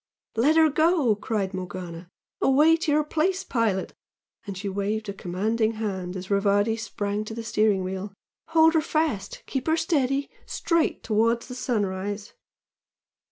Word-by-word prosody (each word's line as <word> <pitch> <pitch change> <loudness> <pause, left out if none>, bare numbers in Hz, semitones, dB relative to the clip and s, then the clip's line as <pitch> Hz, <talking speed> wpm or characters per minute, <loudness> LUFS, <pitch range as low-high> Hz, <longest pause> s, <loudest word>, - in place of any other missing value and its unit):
"Let 275 +8 +3
her 320 -1 +6
go!" 310 - +3
cried 205 -2 -2
Morgana 180 -2 -6 0.3
"Away 300 +5 +5
to 320 -2 -1
your 300 +1 +3
place, 335 +5 0
pilot!" 220 -6 0 0.5
and 200 -2 -5
she 200 +2 -4
waved 205 +2 -2
a - - -3
commanding 215 +5 -1
hand 190 -4 -4
as 185 +2 -7
Rivardi 205 +2 +3
sprang 210 -2 -3
to 220 - -6
the 230 - -5
steering 215 -4 +2
gear 190 +2 -4 0.4
"Hold 320 0 +5
her 320 - +3
fast!... 310 -10 -1
Keep 265 0 -3
her 320 +1 +3
steady! 280 -4 0 0.2
Straight 335 -2 0
towards 230 +1 +1
the - - -5
sun 245 -4 0
rise!" 200 +2 -5
220 Hz, 155 wpm, -25 LUFS, 200-290 Hz, 0.5 s, her